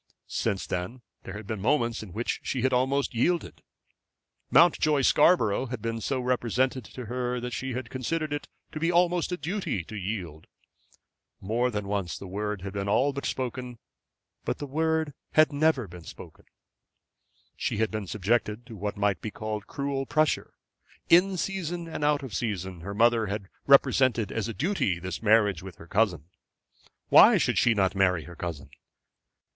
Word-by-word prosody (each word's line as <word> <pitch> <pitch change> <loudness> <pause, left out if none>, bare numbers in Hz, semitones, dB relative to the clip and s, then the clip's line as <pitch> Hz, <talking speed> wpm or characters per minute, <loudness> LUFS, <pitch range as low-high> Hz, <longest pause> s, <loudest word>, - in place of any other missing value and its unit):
Since 95 - -2
that 90 +1 -2 0.4
there 95 - -7
had 105 0 -7
been 105 -1 -4
moments 120 -1 +1
in 105 -4 -9
which 115 +6 -2
she 125 -3 -2
had 130 0 +2
almost 135 +3 +1
yielded. 170 +9 0 0.9
Mountjoy 155 -4 +4
Scarborough 130 - +4
had 125 -1 -5
been 115 0 -3
so 135 +2 -1
represented 125 +1 0
to 125 +2 -8
her 125 +2 -2
that 125 0 -5
she 130 +1 -3
had 125 -1 -5
considered 155 +4 -2
it 145 - -4 0.2
to 155 - -5
be 165 +2 +1
almost 175 0 +2
a 180 - -1
duty 170 - -3
to 110 - -10
yield. 90 -6 -5 0.9
More 115 +6 0
than 105 -4 -4
once 100 -3 -2
the - - -9
word 105 +1 -4
had 100 -1 -5
been 100 0 -2
all 135 +7 +2
but 140 - -3
spoken; 125 -1 -4 0.7
but - - -2
the 145 - -5
word 160 +1 0 0.2
had 155 -1 +5
never 145 -5 +2
been 90 -1 -11
spoken. - - -12 1.1
She - - -2
had 110 0 +1
been 110 -3 -4
subjected 105 +3 0
to 120 -3 -10
what 105 +1 -4
might 100 -3 +1
be 110 - -4
called 105 -1 -5
cruel 140 -1 -3
pressure. 155 0 +1 0.5
In 185 +2 +5
season 175 -2 -3
and 160 -2 -5
out 145 -1 +2
of 130 -6 -7
season 95 -4 -3
her 100 +4 -6
mother 115 0 +3
had 100 -1 -4 0.2
represented 130 -4 +4
as 115 -1 -2
a 115 - -4
duty 160 - 0
this 90 +2 -5
marriage 105 -5 +3
with 95 -2 -9
her 80 - -13
cousin. 90 -4 +1 0.8
Why - - +8
should - - +1
she 115 -2 +4
not 95 -2 +2
marry 90 -4 +2
her 85 +4 -11
cousin? 75 -6 -6
115 Hz, 175 wpm, -27 LUFS, 100-140 Hz, 1.1 s, Why